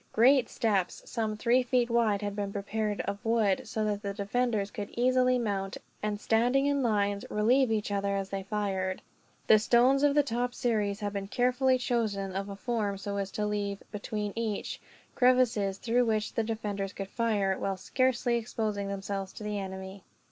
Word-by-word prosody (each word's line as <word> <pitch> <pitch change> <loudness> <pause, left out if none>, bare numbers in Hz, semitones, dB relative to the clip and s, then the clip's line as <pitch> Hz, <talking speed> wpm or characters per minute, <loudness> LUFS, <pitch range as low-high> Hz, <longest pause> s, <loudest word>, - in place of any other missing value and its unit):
Great 250 +2 +5
steps, 200 -5 0
some 220 -3 -2
three 245 +3 +3
feet 250 -1 +1
wide, 225 -4 +2
had 205 -1 -3
been 200 -1 -3
prepared 210 +1 -2
of 200 0 -5
wood; 225 -4 +1
so 215 -1 -1
that 205 -1 -1
the 200 -1 -4
defenders 210 0 0
could 205 -1 -5
easily 255 +1 +3
mount 200 -5 -2 0.2
and, 210 -1 -2
standing 245 +6 +2
in 285 -1 +2
lines, 205 -4 +1
relieve 240 +4 +3
each 210 -2 -1
other 200 0 0
as 195 -1 -3
they 195 0 -2
fired. 190 -2 -2 0.4
The 215 - +6
stones 245 +5 +4
of 290 -1 +3
the 295 - +5
top 245 -1 -2
series 210 -3 0
had 205 -1 -2
been 200 -1 -3
carefully 255 +3 +2
chosen 215 -6 -1
of 195 +1 -3
a 200 - -5
form 210 -2 -2
so 200 +1 -4
as 195 -1 -2
to 210 - -1
leave, 205 -1 -2
between 210 -1 -4
each, 225 -3 -3 0.3
crevices 245 -6 +3
through 240 +3 +1
which 215 -2 0
the 225 - +1
defenders 205 -3 -3
could 195 - -5
fire, 210 -5 +1
while 195 -1 -2
scarcely 245 +3 +1
exposing 220 -3 -2
themselves 195 -1 -4
to - - -9
the 210 -1 -2
enemy. 190 0 -7
210 Hz, 180 wpm, -29 LUFS, 200-240 Hz, 0.4 s, The